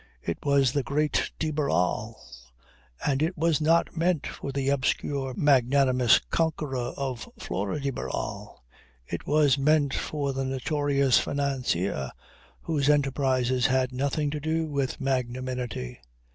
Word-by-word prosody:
It 85 Hz, -, -3 dB
was 140 Hz, -3 st, +3 dB
the 140 Hz, -, 0 dB
Great 145 Hz, +4 st, 0 dB
de 155 Hz, -1 st, -1 dB
Barral. 110 Hz, -6 st, 0 dB, 0.9 s
And 140 Hz, -1 st, +1 dB
it 165 Hz, +3 st, 0 dB
was 160 Hz, -1 st, +2 dB
not 165 Hz, +3 st, +2 dB
meant 165 Hz, -2 st, +1 dB
for 140 Hz, -, -5 dB
the 135 Hz, 0 st, -1 dB
obscure, 135 Hz, -1 st, -1 dB
magnanimous 130 Hz, -3 st, +4 dB
conqueror 145 Hz, -7 st, -1 dB
of 130 Hz, -4 st, -4 dB
Flora 100 Hz, +9 st, -3 dB
de 140 Hz, -1 st, -1 dB
Barral; 120 Hz, -, -5 dB, 0.4 s
it 85 Hz, -, -6 dB
was 145 Hz, -2 st, +3 dB
meant 145 Hz, -1 st, +3 dB
for 140 Hz, -2 st, -2 dB
the 135 Hz, 0 st, -2 dB
notorious 140 Hz, 0 st, +2 dB
financier 125 Hz, -, -1 dB, 0.5 s
whose 150 Hz, -4 st, 0 dB
enterprises 130 Hz, -3 st, +2 dB
had 130 Hz, -1 st, +1 dB
nothing 140 Hz, +3 st, -1 dB
to 150 Hz, -, -3 dB
do 160 Hz, +2 st, -1 dB
with 140 Hz, -3 st, -2 dB
magnanimity. 125 Hz, -, -3 dB
140 Hz, 130 wpm, -27 LUFS, 125-145 Hz, 0.9 s, magnanimous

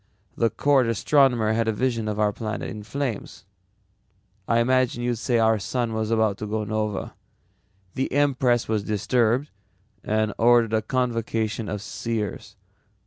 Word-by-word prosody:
"The 115 Hz, -, +2 dB
court 135 Hz, -2 st, +2 dB
astronomer 115 Hz, -1 st, +3 dB
had 115 Hz, 0 st, 0 dB
a -, -, +3 dB
vision 115 Hz, -1 st, -1 dB
of 105 Hz, 0 st, -2 dB
our 105 Hz, -1 st, +2 dB
planet 110 Hz, 0 st, -4 dB
in 105 Hz, -, -7 dB
flames. 125 Hz, 0 st, -5 dB, 1.0 s
I 115 Hz, -, +2 dB
imagine 125 Hz, 0 st, +1 dB
you'd 120 Hz, -1 st, 0 dB
say 120 Hz, 0 st, +1 dB
our 110 Hz, -1 st, +3 dB
sun 120 Hz, +2 st, -2 dB
was 110 Hz, -1 st, -2 dB
about 110 Hz, -3 st, +1 dB
to 110 Hz, -, -4 dB
nova. 105 Hz, -1 st, -2 dB, 0.8 s
The 135 Hz, -, -2 dB
empress 130 Hz, -4 st, +2 dB
was 110 Hz, -1 st, 0 dB
disturbed 115 Hz, +6 st, 0 dB, 0.5 s
and 110 Hz, -1 st, 0 dB
ordered 115 Hz, -1 st, +4 dB
a 110 Hz, -, +2 dB
convocation 115 Hz, -2 st, -2 dB
of 105 Hz, -1 st, -4 dB
seers. 110 Hz, -2 st, -4 dB
115 Hz, 140 wpm, -24 LUFS, 110-125 Hz, 1.0 s, ordered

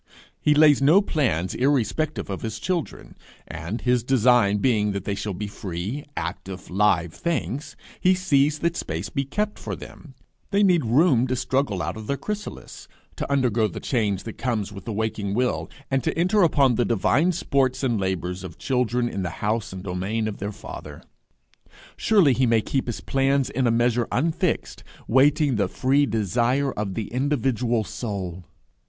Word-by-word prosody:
He 150 Hz, -, +3 dB
lays 150 Hz, -2 st, +6 dB
no 155 Hz, +8 st, +6 dB
plans 125 Hz, -, 0 dB
irrespective 145 Hz, +3 st, 0 dB
of 95 Hz, -, -4 dB
his 110 Hz, -1 st, -4 dB
children; 170 Hz, +8 st, -4 dB, 0.3 s
and, 85 Hz, +9 st, -5 dB
his 125 Hz, -1 st, +2 dB
design 120 Hz, -5 st, +4 dB
being 105 Hz, -3 st, +1 dB
that 100 Hz, -2 st, -3 dB
they 100 Hz, -, -1 dB
shall 100 Hz, 0 st, -4 dB
be 105 Hz, -, -4 dB
free, 100 Hz, +6 st, -5 dB
active, 90 Hz, +2 st, -5 dB
live 90 Hz, -4 st, +2 dB
things, 150 Hz, -3 st, -3 dB, 0.2 s
he 185 Hz, +1 st, +4 dB
sees 150 Hz, -5 st, +2 dB
that 170 Hz, +2 st, -1 dB
space 85 Hz, -, -4 dB
be 140 Hz, -, -2 dB
kept 210 Hz, +10 st, -2 dB
for -, -, -5 dB
them: 140 Hz, -5 st, -12 dB, 0.3 s
they 200 Hz, +1 st, +3 dB
need 175 Hz, -8 st, +3 dB
room 130 Hz, +1 st, +4 dB
to 130 Hz, -, 0 dB
struggle 130 Hz, -7 st, 0 dB
out -, -, -3 dB
of 110 Hz, -1 st, -8 dB
their 140 Hz, -, -1 dB
chrysalis, 210 Hz, +4 st, -6 dB, 0.3 s
to -, -, -4 dB
undergo 120 Hz, -5 st, +2 dB
the 95 Hz, -, -7 dB
change 105 Hz, -7 st, -1 dB
that 115 Hz, -, -8 dB
comes 110 Hz, -6 st, -1 dB
with 95 Hz, -2 st, -10 dB
the 115 Hz, -, -4 dB
waking 105 Hz, -2 st, -2 dB
will, 125 Hz, +1 st, 0 dB, 0.2 s
and 135 Hz, -2 st, +1 dB
to -, -, -1 dB
enter 185 Hz, +5 st, +3 dB
upon 140 Hz, -7 st, +4 dB
the 120 Hz, -, +2 dB
divine 140 Hz, -, +2 dB
sports 135 Hz, -6 st, 0 dB
and 120 Hz, -5 st, +1 dB
labours 95 Hz, -1 st, -2 dB
of 85 Hz, -4 st, -8 dB
children 125 Hz, -2 st, 0 dB
in 100 Hz, -, -3 dB
the 90 Hz, -, -2 dB, 0.2 s
house 110 Hz, +1 st, -1 dB
and 95 Hz, -1 st, -7 dB
domain 100 Hz, +4 st, -2 dB
of 105 Hz, -, -5 dB
their 100 Hz, +1 st, -3 dB
Father. -, -, -9 dB, 0.9 s
Surely 190 Hz, -11 st, +4 dB
he 130 Hz, 0 st, +2 dB
may 115 Hz, -1 st, +3 dB
keep 135 Hz, +4 st, -2 dB
his 120 Hz, -, -4 dB
plans 135 Hz, 0 st, +1 dB
in 130 Hz, -1 st, +1 dB
a -, -, +3 dB
measure 120 Hz, +1 st, +2 dB
unfixed, 160 Hz, +5 st, -1 dB, 0.2 s
waiting 140 Hz, +1 st, +3 dB
the 100 Hz, -2 st, +1 dB
free 135 Hz, +8 st, +2 dB
desire 120 Hz, +6 st, +1 dB
of 100 Hz, -3 st, -4 dB
the 110 Hz, -, -2 dB
individual 125 Hz, -3 st, 0 dB
soul! 100 Hz, -6 st, -5 dB
120 Hz, 175 wpm, -24 LUFS, 105-140 Hz, 0.9 s, lays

